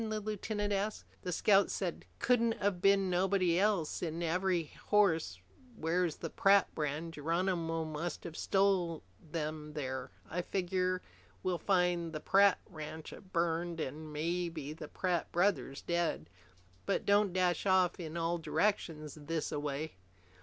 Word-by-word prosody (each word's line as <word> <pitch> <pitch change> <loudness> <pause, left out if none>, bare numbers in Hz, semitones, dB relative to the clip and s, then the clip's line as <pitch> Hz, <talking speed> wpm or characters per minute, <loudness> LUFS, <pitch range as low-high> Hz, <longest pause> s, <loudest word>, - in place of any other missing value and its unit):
the 215 0 -1
lieutenant 210 0 -2
asked. 205 +2 -2 0.2
The 180 - -3
scout 195 +2 +4
said, 180 -4 -3
"Couldn't 235 -2 +3
of 200 -4 -1
been 195 0 +4
nobody 180 -1 +2
else, 200 -6 +1
an' 170 0 -2
every 180 +1 +1 0.2
horse 165 - +3 0.4
wears 165 0 +1
the 165 - -5
Pratt 200 0 +4
brand. 155 +2 -3
Geronimo 165 +1 0
must 155 +2 -4
of 165 -2 -6
stole 190 -5 +1 0.2
them 155 -1 -4
there. 130 -3 -4 0.2
I 180 +2 -2
figure 185 0 -1 0.4
we'll 180 -2 0
find 180 -3 +1
the 155 - -3
Pratt 195 +4 +5
ranch 155 -1 -7 0.2
burned 170 0 0
an' 155 +2 -5
maybe 165 -1 -2
the 155 -1 -8
Pratt 180 0 -1
brothers 170 -7 +1
dead. 170 - -1 0.6
But - - 0
don't 200 -1 +4
dash 180 0 +1
off 185 -2 +3
in 165 -1 -5
all 170 +1 0
directions 160 -4 -1
thisaway." 150 -1 -3
170 Hz, 135 wpm, -33 LUFS, 160-190 Hz, 0.6 s, Pratt